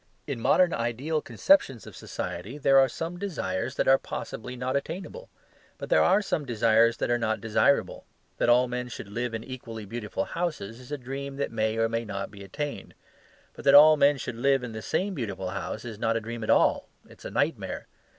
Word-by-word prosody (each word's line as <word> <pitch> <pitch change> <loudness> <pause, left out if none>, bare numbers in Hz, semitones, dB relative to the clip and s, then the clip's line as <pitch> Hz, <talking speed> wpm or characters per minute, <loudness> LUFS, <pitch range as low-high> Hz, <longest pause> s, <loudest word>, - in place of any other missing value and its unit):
In 140 -5 -4
modern 175 +9 +3
ideal 125 +7 -1
conceptions 145 - +2
of - - -11
society 100 +11 -6
there 135 -1 +5
are 135 -1 +4
some 165 +6 -5
desires 130 - -3
that - - 0
are 135 0 +6
possibly 125 +3 -6
not 125 +1 -2
attainable: 185 - -5 0.5
but - - -7
there - - +5
are 195 +3 +4
some 160 - -1
desires 115 -2 +3
that - - -1
are 120 - +2
not 110 -1 0
desirable. 115 +5 +1 0.3
That - - +2
all 125 +1 +5
men 125 0 -3
should 120 - -8
live 115 +3 -3
in 115 - -5
equally 115 -4 -8
beautiful 105 0 -4
houses 155 - -4
is 125 +2 -13
a 145 - -2
dream 135 +2 -6
that 140 - -2
may 110 0 0
or 115 0 +2
may 115 +1 -2
not 100 -3 -5
be 100 -2 -11
attained. 145 +10 -6 0.6
But - - -11
that 140 - +7
all 155 +2 +9
men 145 -1 +4
should 120 -3 -5
live 135 +1 +2
in 125 - -5
the 110 0 -6
same 190 - -1
beautiful 100 - -4
house 110 - -5
is 110 -3 -7
not 115 +1 +1
a - - 0
dream 115 +1 -6
at - - -5
all; - - +3 0.2
it - - -17
is - - -15
a - - -4
nightmare. - - -2
125 Hz, 210 wpm, -27 LUFS, 115-140 Hz, 0.6 s, all